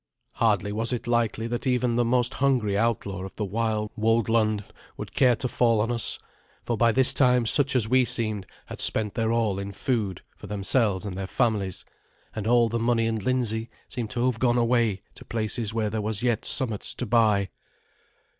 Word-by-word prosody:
Hardly 105 -3 +1
was 110 +3 -2
it 125 0 -3
likely 115 -1 0
that 120 +3 -3
even 125 -2 +1
the 120 - +2
most 120 +1 +1
hungry 125 -7 +1
outlaw 100 -4 -1
of 95 - -9
the 105 - -3
wild 105 +1 -2
woldland 110 -1 +1 0.3
would - - -8
care 125 -3 +4
to 125 - -3
fall 115 -2 +2
on 115 +3 0
us; 115 -1 +2 0.5
for 120 - -2
by 115 +1 +3
this 130 +2 +4
time 125 -3 +3
such 140 +3 +3
as 115 -4 +2
we 130 +2 +3
seemed 110 -5 0 0.2
had - - -7
spent 105 -2 +3
their 115 -1 -1
all 110 -4 0
in 100 0 -5
food 105 -3 -2
for - - -12
themselves 105 0 0
and 100 -3 -5
their 95 0 -5
families, 105 -5 -1 0.5
and 110 -1 -4
all 120 0 +4
the 115 +1 -2
money 115 0 +1
in 115 0 -1
Lindsey 115 0 -1 0.2
seemed 120 -3 -5
to 125 0 -1
have 125 -3 0
gone 120 -1 +2
away 115 -4 +1
to - - -14
places 110 -1 -2
where 110 -2 -2
there 110 0 -2
was 105 +1 -3
yet 120 -3 0
somewhat 115 -7 +2
to 125 - -5
buy. 105 -4 +2
115 Hz, 190 wpm, -25 LUFS, 105-120 Hz, 0.5 s, care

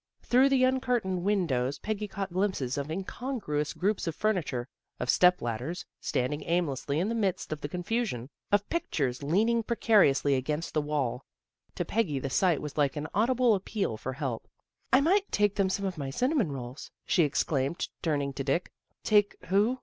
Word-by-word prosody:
Through 260 +3 +4
the 265 -2 +3
uncurtained 250 -8 0
win 200 0 +2
dows 130 -1 -1
Peggy 210 +5 -3
caught 195 -2 -5
glimpses 185 -10 0
of 140 +1 -3
incongruous 190 - -3
groups 200 0 -1
of 165 - -2
furniture, 165 - -1 0.3
of 125 - +2
step 180 0 +4
ladders 120 +10 -3
standing 135 +4 -1
aimlessly 150 -5 0
in 185 - +1
the 230 - -1
midst 195 -8 -1
of 150 - -7
the 145 - -4
confusion, 180 - -2 0.2
of 205 0 +3
pic 340 - -2
tures 130 -3 -1
leaning 215 +11 +2
precariously 205 - +3
against 150 +5 -2
the 155 - +2
wall. 140 -4 -2 0.5
To - - -2
Peggy 205 -10 0
the 135 0 -3
sight 175 -1 +2
was 150 0 -5
like 140 -2 +2
an 150 +1 -4
audible 240 +3 +3
appeal 195 - -1
for 130 +4 -5
help. 130 -4 -4 0.2
" - - -45
I 260 +2 +6
might 385 +7 +2
take 205 -1 +2
them 195 -2 +1
some 200 +1 -1
of 185 -4 -3
my 140 -1 -3
cinnamon 250 - +1
rolls," 125 0 -7 0.2
she 180 - +3
exclaimed, 145 0 0
turning 145 -4 0
to 135 - -3
Dick. 145 +6 0 0.2
" - - -48
Take 205 -1 +3
who? 210 +7 +3
175 Hz, 185 wpm, -29 LUFS, 140-215 Hz, 0.5 s, I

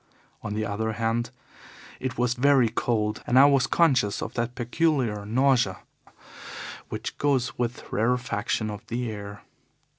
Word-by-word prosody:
On 105 - -4
the 110 0 -1
other 110 +2 -2
hand, 115 +1 -1 0.7
it 130 0 -4
was 125 0 +2
very 130 -2 +4
cold, 110 -2 -1
and 125 - +3
I 135 - +9
was 140 -2 +4
conscious 125 -11 +2
of 115 - -6
that 120 +1 -2
peculiar 120 -5 0
nausea 120 -4 +2 1.1
which - - -5
goes 135 -4 +1
with 120 0 -2
rarefaction 115 -2 0
of 105 +2 -8
the 120 0 -2
air. 100 -1 -8
120 Hz, 140 wpm, -26 LUFS, 110-130 Hz, 1.1 s, I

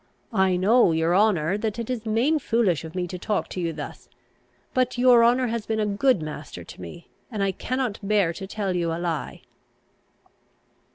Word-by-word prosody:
I 190 -3 +3
know, 200 0 +4
your 165 +2 +2
honour, 195 -3 +2
that 215 0 -2
it 230 -1 -4
is 235 -3 -4
main 250 +9 +2
foolish 225 - +1
of 160 +2 -9
me 180 -1 -1
to 180 +1 -7
talk 210 +3 -1
to - - -5
you 170 -1 -1
thus; - - -8 0.6
but 255 -1 +1
your 245 -1 +6
honour 245 +2 +4
has 230 -2 -3
been 220 -1 -1
a 215 - +1
good 210 - +2
master 150 - -7
to 85 - -12
me, 90 - -10 0.2
and 210 -4 -2
I 195 - +1
cannot 250 +2 -3
bear 200 -4 +2
to 190 +2 -7
tell 195 -2 -2
you 170 -2 0
a 165 - -2
lie." 170 -3 -4
205 Hz, 190 wpm, -25 LUFS, 175-235 Hz, 0.6 s, your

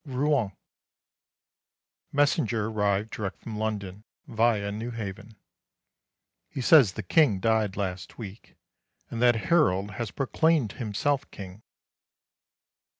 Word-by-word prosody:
Rouen. 135 -6 0 1.6
Messenger 140 -6 +1
arrived 105 0 0
direct 100 -3 -4
from 110 -2 -6
London, 105 -2 -4 0.2
via 110 -3 +1
Newhaven. 110 -1 -6 1.1
He - - -7
says 130 - +6
the 110 - -5
King 110 - +3
died 110 -2 +1
last 95 -3 -4
week, 105 -2 -10 0.6
and 115 - -4
that 120 -1 +5
Harold 105 - +2
has 115 +2 -4
proclaimed 145 0 +1
himself 135 +5 -2
King. 95 +1 -10
110 Hz, 100 wpm, -27 LUFS, 100-125 Hz, 1.6 s, says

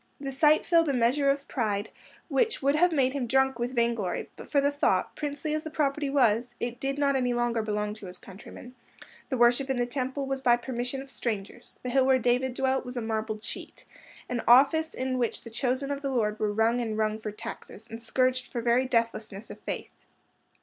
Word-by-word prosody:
The 275 -1 -4
sight 300 +3 +4
filled 335 -3 +4
a - - +1
measure 255 +4 +2
of 275 0 0
pride 210 -4 -2 0.4
which 455 -3 +1
would 280 +1 +3
have 350 +4 +4
made 270 -4 +2
him 270 -4 -2
drunk 265 0 +2
with 245 +2 -2
vainglory 235 -6 -1
but - - -11
for 285 - +3
the 285 +1 +2
thought, 285 - +1
princely 295 +1 -3
as 310 - -1
the 315 - -6
property 290 -1 0
was, 240 -3 +2
it 240 0 -4
did 275 +1 -2
not 280 -1 +2
any 250 -2 +1
longer 240 -1 +1
belong 210 -1 -2
to 210 -3 -10
his 180 0 -9
countrymen; 215 +5 -12 0.6
the 260 - -1
worship 245 +3 +4
in 265 - 0
the 245 - +1
Temple 260 +2 -3
was 270 0 -3
by 240 -2 +4
permission 250 +2 -4
of 275 - -12
strangers; 220 -1 -5
the 250 - -3
hill 265 +1 +4
where 265 -1 +5
David 250 +1 +1
dwelt 265 0 +1
was 250 0 -7
a - - -1
marbled 220 -1 -3
cheat—an 250 - -7
office 285 +6 +5
in 255 0 -2
which 235 -2 -1
the 230 - -10
chosen 255 +4 -1
of 280 0 -3
the 275 - -2
Lord 215 -5 0
were 210 -1 +1
wrung 225 +3 +2
and 220 -2 -3
wrung 215 0 0
for 215 - -5
taxes, 225 0 -9
and 225 0 -8
scourged 255 +2 +1
for 240 - -4
very 240 +2 +2
deathlessness 230 -3 -2
of - - -10
faith. - - -5
250 Hz, 210 wpm, -28 LUFS, 230-275 Hz, 0.6 s, where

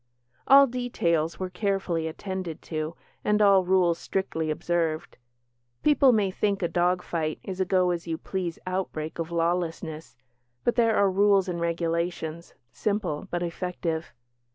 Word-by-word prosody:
All 275 +1 +9
details 170 - -1
were 185 -1 -3
carefully 180 -4 -1
attended 185 0 -5
to, 155 0 -4 0.3
and 210 0 +2
all 200 -2 +6
rules 180 -2 +3
strictly 165 -5 -2
observed. 160 0 -1 0.7
People 285 -3 +5
may 210 -5 +2
think 200 0 0
a - - +3
dog 180 +2 +1
fight 155 -2 -2
is 190 -1 -6
a - - +2
go 185 -1 +2
as 170 -1 -4
you 165 -1 -2
please 180 -2 -4
outbreak 180 -4 -3
of 165 0 -2
lawlessness, 165 -3 -2 0.5
but 240 - +2
there 230 -2 +3
are 200 -1 +4
rules 195 0 +4
and 170 -2 -3
regulations 170 -1 -2 0.2
simple, 195 - -2
but 175 0 -2
effective. 170 -2 -3
175 Hz, 145 wpm, -27 LUFS, 165-195 Hz, 0.7 s, All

